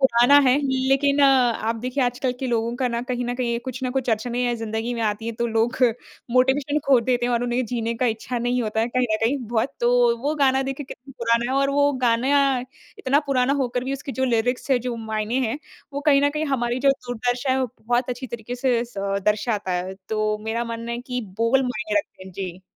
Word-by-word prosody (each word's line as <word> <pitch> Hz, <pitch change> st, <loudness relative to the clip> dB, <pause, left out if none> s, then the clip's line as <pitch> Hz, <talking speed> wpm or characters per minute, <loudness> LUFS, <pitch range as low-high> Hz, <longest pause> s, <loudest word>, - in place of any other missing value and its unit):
पुराना 260 Hz, +2 st, +6 dB
है 255 Hz, -, +5 dB, 0.3 s
लेकिन 280 Hz, +1 st, +3 dB
आप 245 Hz, -4 st, +3 dB
देखिए 255 Hz, +4 st, -2 dB
आजकल 245 Hz, +1 st, -1 dB
के 260 Hz, -, -2 dB
लोगों 235 Hz, 0 st, 0 dB
का 255 Hz, -1 st, 0 dB
न 235 Hz, 0 st, -2 dB
कहीं 245 Hz, -1 st, -1 dB
न 245 Hz, 0 st, -2 dB
कहीं 235 Hz, -2 st, -1 dB
कुछ 260 Hz, 0 st, -6 dB
ना 255 Hz, -, -1 dB
कुछ 255 Hz, -2 st, -1 dB
अड़चनें 235 Hz, +3 st, -1 dB
या 240 Hz, -1 st, +1 dB
ज़िंदगी 225 Hz, +1 st, -3 dB
में 235 Hz, -, -4 dB
आती 215 Hz, +1 st, -1 dB
हैं 230 Hz, -, -3 dB
तो 235 Hz, -, 0 dB
लोग 225 Hz, +2 st, 0 dB, 0.5 s
मोटिवेशन 270 Hz, +4 st, +2 dB
खो 270 Hz, -3 st, +6 dB
देते 245 Hz, 0 st, 0 dB
हैं 245 Hz, -, 0 dB
और 235 Hz, 0 st, +1 dB
उन्हें 245 Hz, +1 st, 0 dB
जीने 230 Hz, 0 st, -2 dB
का 245 Hz, +2 st, 0 dB
इच्छा 230 Hz, +2 st, -2 dB
नहीं 245 Hz, +1 st, 0 dB
होता 220 Hz, 0 st, -1 dB
है 230 Hz, -, 0 dB
कहीं 250 Hz, +1 st, +1 dB
ना 215 Hz, -, +3 dB
कहीं 265 Hz, +5 st, +2 dB
बहुत। 240 Hz, +4 st, -1 dB
तो 240 Hz, 0 st, +3 dB
वो 295 Hz, +2 st, 0 dB
गाना 270 Hz, -2 st, +3 dB
देखिए 270 Hz, +1 st, -4 dB
कितना 270 Hz, +2 st, -11 dB
पुराना 235 Hz, +1 st, +1 dB
है 275 Hz, -, +2 dB
और 275 Hz, 0 st, +2 dB
वो 285 Hz, 0 st, +3 dB, 0.2 s
गाना 255 Hz, +5 st, +3 dB, 0.6 s
इतना 280 Hz, +3 st, +2 dB
पुराना 265 Hz, 0 st, +2 dB
होकर 250 Hz, 0 st, -1 dB
भी 270 Hz, -, -2 dB
उसकी 275 Hz, 0 st, -5 dB
जो 260 Hz, -, -1 dB
लीरिक्स 245 Hz, +2 st, 0 dB
है 260 Hz, -, +4 dB
जो 240 Hz, -, -2 dB
मायने 220 Hz, +2 st, -2 dB
हैं 250 Hz, +7 st, -3 dB, 0.3 s
वो 285 Hz, -, -3 dB
कहीं 280 Hz, -2 st, +6 dB
ना 285 Hz, -, +3 dB
कहीं 305 Hz, +1 st, -2 dB
हमारी 240 Hz, +1 st, -1 dB
जो -, -, +8 dB
दुर्दशा 245 Hz, 0 st, -2 dB
है 265 Hz, -, +1 dB
वो 260 Hz, -, +1 dB, 0.2 s
बहुत 245 Hz, +2 st, 0 dB
अच्छी 250 Hz, +1 st, -4 dB
तरीके 235 Hz, +1 st, -6 dB
से 245 Hz, -2 st, +1 dB
स 240 Hz, -, -17 dB, 0.3 s
दर्शाता 210 Hz, -2 st, 0 dB
है। 180 Hz, +1 st, -3 dB
तो 215 Hz, -1 st, 0 dB
मेरा 230 Hz, +2 st, -1 dB
मानना 230 Hz, 0 st, -5 dB
है 235 Hz, -, -3 dB
कि 250 Hz, 0 st, -4 dB, 0.2 s
बोल 245 Hz, +4 st, +3 dB
मायने 215 Hz, -4 st, -1 dB
रखते 200 Hz, -, -7 dB
हैं। 190 Hz, -, -11 dB
जी। 185 Hz, -1 st, -6 dB
245 Hz, 230 wpm, -23 LUFS, 230-260 Hz, 0.6 s, जो